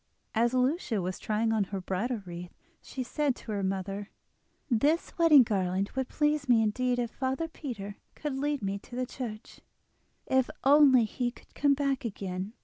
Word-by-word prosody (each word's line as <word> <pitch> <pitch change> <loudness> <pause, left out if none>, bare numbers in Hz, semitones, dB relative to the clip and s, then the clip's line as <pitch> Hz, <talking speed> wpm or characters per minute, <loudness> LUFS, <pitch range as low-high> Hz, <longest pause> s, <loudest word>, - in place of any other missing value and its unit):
As 235 +2 +2
Lucia 255 - +1
was 185 0 -3
trying 225 +1 0
on 215 -3 +2
her 195 +1 -4
bridal 205 +5 -2
wreath 175 0 -8 0.3
she 260 - -5
said 280 +1 0
to 220 - -8
her 205 -1 -1
mother: 195 +1 -3 0.6
"This 290 +6 +1
wedding 310 -5 +8
garland 195 -2 -1
would 265 -1 -2
please 295 -2 0
me 230 -2 +5
indeed 250 +3 0
if 240 -2 -1
father 265 +5 -2
Peter 215 -11 -7 0.2
could 295 -2 -4
lead 285 -2 -1
me 195 +1 -2
to 240 - -12
the 255 0 -1
church. 230 -4 -7 0.7
If 260 -1 +2
only 275 -3 +7
he 240 +3 -2
could 240 - -17
come 285 -1 +3
back 275 -1 0
again! 195 -2 -4
240 Hz, 170 wpm, -29 LUFS, 200-270 Hz, 0.7 s, wedding